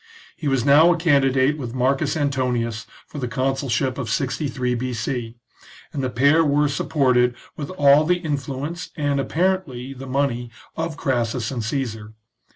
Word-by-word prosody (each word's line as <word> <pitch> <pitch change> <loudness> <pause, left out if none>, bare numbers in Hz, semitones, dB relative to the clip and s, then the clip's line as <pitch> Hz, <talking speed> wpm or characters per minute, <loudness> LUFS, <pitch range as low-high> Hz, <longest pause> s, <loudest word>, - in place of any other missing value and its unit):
He 155 - -5
was 135 -3 +1
now 150 +5 +7
a 175 - +1
candidate 140 -3 +3
with 120 -2 -5
M. - - +1 0.4
Antonius 125 -4 -1 0.2
for 150 - -8
the 125 - -2
consulship 130 0 -1
of 120 -5 -3
63 125 0 -1
B.C., 120 -1 -3 0.6
and 140 -3 -3
the 130 - 0
pair 140 +8 +4
were 145 0 +2
supported 130 -4 +2 0.2
with 145 - -6
all 145 -4 +5
the 180 +3 +2
influence, 145 0 -4
and, 145 -2 0
apparently, 155 -5 -1
the 135 0 -9
money 130 -3 -1 0.3
of 160 -1 -3
Crassus 120 -2 -1
and 120 -4 -3
Caesar. 110 -3 -4
135 Hz, 150 wpm, -22 LUFS, 125-145 Hz, 0.6 s, now